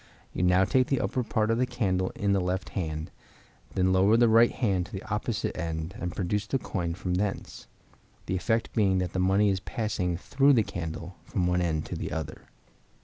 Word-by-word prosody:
You - - -2
now 90 +1 +4
take 130 +5 +2
the 135 - +1
upper 130 - -1
part 110 -1 0
of 115 - +1
the 125 - +2
candle 95 -7 0
in 100 -1 0
the 100 - +2
left 90 +1 -2
hand; 80 -4 -4 0.6
then 95 0 +2
lower 100 +4 +5
the 120 0 +5
right 115 +1 +6
hand 95 -7 0
to - - -18
the 95 - -6
opposite 105 +1 -2
end 80 0 -4
and 90 -1 -4
produce 100 +2 -1
the 135 - +1
coin 85 -9 -3
from 90 -1 -3
thence, 100 +2 -3 0.6
the 95 - -2
effect 110 +5 0
being 100 -4 +3
that 90 -1 -2
the 95 - -1
money 95 +3 +3
is 95 -1 0
passed 110 +3 -4 0.2
through 140 +7 +3
the 115 -4 +4
candle, 85 -1 -6
from 90 - -1
one 90 0 +1
end 80 -3 -1
to - - -5
the - - -4
other. 80 -1 -5
95 Hz, 205 wpm, -28 LUFS, 90-110 Hz, 0.6 s, right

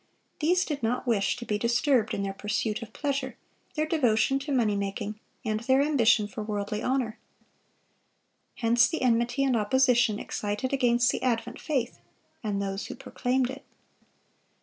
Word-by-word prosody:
These 355 +4 +2
did 290 -3 -3
not 240 +3 -1
wish 220 -5 +1
to 240 - -7
be 210 -2 -1
disturbed 240 0 +2
in 200 - -2
their 195 0 -2
pursuit 210 +2 -2
of 225 -2 -8
pleasure, 275 0 -3 0.4
their 305 0 +1
devotion 270 -4 +2
to 280 +2 -5
money 230 -6 +2
making, 200 +1 -3 0.3
and 215 -1 0
their 260 +3 +2
ambition 235 -8 +3
for 210 +1 -7
worldly 210 0 -3
honor. 250 -4 -1 1.4
Hence 235 +1 +4
the 320 -4 -3
enmity 240 +2 +2
and 265 -2 +2
opposition 240 0 +3
excited 210 +6 -3
against 245 -2 +3
the - - -3
advent 235 -2 -1
faith 260 -5 -2 0.4
and 205 -2 -1
those 195 0 -3
who - - -7
proclaimed 255 0 -1
it. 275 +1 -9
240 Hz, 155 wpm, -27 LUFS, 215-265 Hz, 1.4 s, Hence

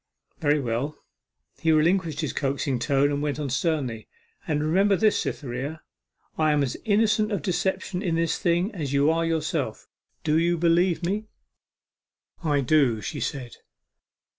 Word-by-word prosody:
'Very 150 0 +2
well.' 130 +3 -2 0.6
He 160 - +2
relinquished 160 0 +2
his 155 - -2
coaxing 140 -2 -1
tone, 140 +2 +2
and 145 0 -1
went 145 -1 -1
on 140 -3 -3
sternly: 130 -7 -1 0.4
'And 150 -1 0
remember 195 +6 +3
this, 215 +2 +2
Cytherea, 140 +4 -4 0.6
I 155 -1 +3
am 145 -1 +2
as 130 - -2
innocent 215 0 +2
of 195 -8 -2
deception 185 +1 -1
in 175 -5 0
this 165 0 0
thing 175 +5 +1
as 150 -7 -4
you 140 +2 +4
are 165 +1 +1
yourself. 160 -2 -2 0.4
Do 155 0 +2
you 170 +1 +2
believe 170 +1 +2
me?' 210 +4 -2 1.2
'I 145 -3 +2
do,' 130 -5 +3
she - - -5
said. 130 -5 -4
155 Hz, 150 wpm, -25 LUFS, 140-175 Hz, 1.2 s, you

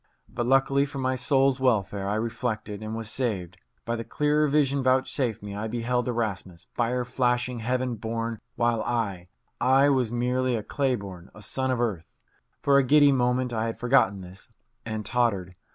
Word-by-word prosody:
But, 120 -1 -3
luckily 135 +2 +3
for 140 - -8
my 130 -1 0
soul's 135 +1 +2
welfare, 100 -6 +1
I 105 - 0
reflected 110 -2 -3
and 110 +1 -5
was 115 -1 -4
saved. 110 -7 -2 0.3
By 115 - -1
the 115 - -4
clearer 150 +6 +1
vision 140 -1 +2
vouchsafed 130 -3 0
me, 100 -1 -6
I 105 +2 -3
beheld 120 +2 -1
Erasmus, 100 -7 -3
fire 125 +1 0
flashing, 125 0 0
heaven 125 +2 -1
born, 115 +1 -3 0.2
while 120 -1 +1
I 100 -8 -2 0.3
I 135 +2 +4
was 130 -5 +1
merely 125 +1 0
a 110 - -3
clay 135 +3 0
born, 95 -4 -9
a 105 - -11
son 130 +4 -2
of 130 -2 0
earth. 105 -9 -3 0.5
For 140 0 +5
a - - +3
giddy 145 +2 +6
moment 125 -1 +1
I 110 0 -1
had 115 - -5
forgotten 120 -6 +3
this, 95 +1 -12 0.4
and 110 -1 -4
tottered. 100 -7 0
120 Hz, 175 wpm, -26 LUFS, 110-130 Hz, 0.5 s, giddy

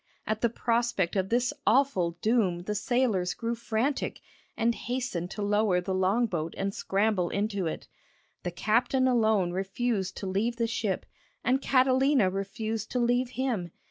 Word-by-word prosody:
] - - -42
At 215 0 -2
the 235 - +3
prospect 230 -6 0
of 190 -1 0
this 245 +1 +1
awful 190 -12 +3
doom 215 -7 +2
the 210 +4 -3
sailors 210 -5 +1
grew 230 +5 -2
frantic, 235 +4 -1 0.4
and 235 +1 +2
hastened 245 -9 -3
to 210 - -4
lower 205 -2 +2
the 185 +1 -3
long 190 +6 +2
boat 165 -6 -3
and 195 0 -1
scramble 195 -3 0
into 200 -3 -1
it. 160 - -5 0.5
The - - -3
captain 235 +8 +1
alone 220 -7 +3
refused 195 +2 -2
to - - -5
leave 205 +5 0
the 230 -1 0
ship, 220 -4 -2 0.4
and 260 +3 +2
Catalina 260 -5 +3
refused 215 +3 -3
to 250 - +1
leave 245 +1 +2
him. 235 -10 -1
220 Hz, 160 wpm, -28 LUFS, 190-240 Hz, 0.5 s, the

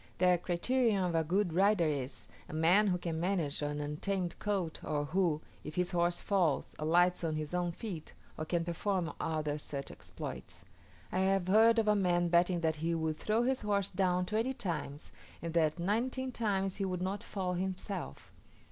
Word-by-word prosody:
Their 180 -1 +4
criterion 205 +4 +1
of 180 -2 0
a 165 0 +2
good 180 +2 +1
rider 195 0 +4
is, 140 -3 -3 0.2
a - - -8
man 175 +7 +4
who 180 -2 +2
can 170 -2 -3
manage 170 -5 0
an 145 0 -2
untamed 170 +5 -2
colt, 195 -6 -2
or 145 -1 -1
who, 165 -1 +1 0.2
if 150 - -7
his 180 0 0
horse 175 0 +1
falls, 180 -8 +1
alights 175 +4 +3
on 160 -2 0
his 155 +1 -4
own 175 -1 0
feet, 175 -4 -7 0.2
or 155 - -4
can 170 +1 0
perform 175 0 -1
other 150 -2 -1
such 140 -1 -5
exploits. - - -8 0.5
I 185 - 0
have 190 -1 +2
heard 225 +4 +6
of 225 -1 +2
a 210 - +5
man 175 -3 +2
betting 175 0 +3
that 160 -1 +1
he 165 +2 0
would 160 -1 -1
throw 220 +6 +1
his 260 +1 +1
horse 200 -2 0
down 180 -1 +1
twenty 225 +7 -1
times, 160 - -4 0.3
and 165 -1 -5
that 160 -1 +2
nineteen 245 +8 -1
times 195 -5 -1
he 195 - -1
would 180 -1 -2
not 195 +2 -2
fall 185 -2 -3
himself. 185 - -4
180 Hz, 185 wpm, -33 LUFS, 160-195 Hz, 0.5 s, heard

